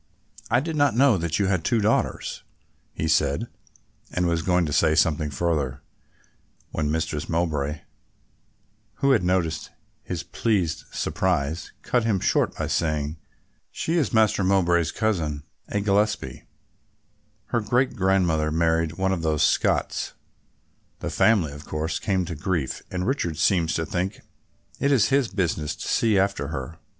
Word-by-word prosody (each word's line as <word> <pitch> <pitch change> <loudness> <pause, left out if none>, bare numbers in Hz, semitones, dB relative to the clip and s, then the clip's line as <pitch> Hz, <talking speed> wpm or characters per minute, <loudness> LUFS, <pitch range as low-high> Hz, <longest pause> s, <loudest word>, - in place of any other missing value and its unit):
"I 120 - +3
did 160 +2 -4
not 145 -6 +3
know 130 -1 +5
that 80 -2 -1
you 100 - +1
had 95 -3 0
two 115 +7 +2
daughters," 105 +2 0 0.5
he 80 - -3
said, 75 -3 +1 0.6
and 90 - 0
was 85 -1 +1
going 90 +1 +2
to 75 - -3
say 80 +1 +3
something 80 -2 +2
further, 70 -3 -1 0.9
when 75 -2 -1
Mistress 75 -1 -2
Mowbray, 75 -3 -1 1.1
who 140 -1 +2
had 130 - +3
noticed 85 -4 0 0.3
his - - -5
pleased 95 -8 -1
surprise, 85 -5 -1
cut 120 -2 +1
him 110 -4 +1
short - - +1
by - - -1
saying: 75 -1 -1 0.5
"She 165 - -3
is 140 - 0
Master 110 -3 +3
Mowbray's 85 -3 +2
cousin, 80 -10 -1 0.2
a 105 - -1
Gillespie, 105 - 0 1.0
her 120 - +1
great 125 +5 +1
grandmother 90 -6 +2
married 80 0 +1
one 95 +2 0
of 90 -3 -1
those 80 -2 +1
Scots; - - +1 0.8
the - - -5
family 100 -10 +3
of 75 +1 -10
course 75 +2 -2
came 95 -3 0
to 85 - -5
grief 80 -3 -2
and 90 0 -3
Richard 110 - -1
seems 85 -1 +2
to 80 - -1
think 90 +5 -3 0.6
it 140 - +2
is 125 -7 +4
his 135 -2 +3
business 85 -7 -1
to - - -7
see 110 -3 +2
after 95 -7 +1
her. 80 +2 -6
85 Hz, 150 wpm, -25 LUFS, 80-105 Hz, 1.1 s, know